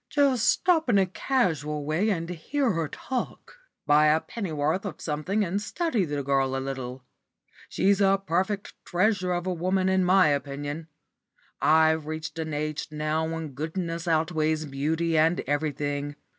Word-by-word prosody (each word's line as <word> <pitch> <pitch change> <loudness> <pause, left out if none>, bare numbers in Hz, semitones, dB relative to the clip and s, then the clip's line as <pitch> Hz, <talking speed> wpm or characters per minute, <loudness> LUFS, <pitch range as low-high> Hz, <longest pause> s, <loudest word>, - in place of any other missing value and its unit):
Just 275 -5 +2
stop 325 -6 +2
in 210 - +4
a 195 - +4
casual 160 - -1
way 165 +9 +1
and 165 -5 -1
hear 230 - -1
her 165 -3 -1
talk. 260 - -5 0.3
Buy 150 +1 +5
a 155 +1 +4
pennyworth 160 -4 -2
of 190 -7 -6
something 180 +8 -1
and 190 +3 -2
study 245 - -1
the 145 -2 -3
girl 135 -1 +1
a - - 0
little. 130 -1 -5 0.7
She's 200 +1 +2
a 195 0 +4
perfect 190 +4 -1
treasure 185 0 +1
of 175 0 -1
a 185 - 0
woman 185 +2 +1
in 190 0 +3
my 185 -3 +5
opinion. 145 +2 -3 0.7
I've 160 0 +4
reached 155 +1 -5
an 160 -1 -3
age 150 0 -3
now 155 +1 -1
when 165 -1 -4
goodness 165 +4 -4
outweighs 160 -1 +1
beauty 155 +4 0
and 165 +3 +3
everything. 145 0 -2
160 Hz, 155 wpm, -26 LUFS, 150-190 Hz, 0.7 s, Buy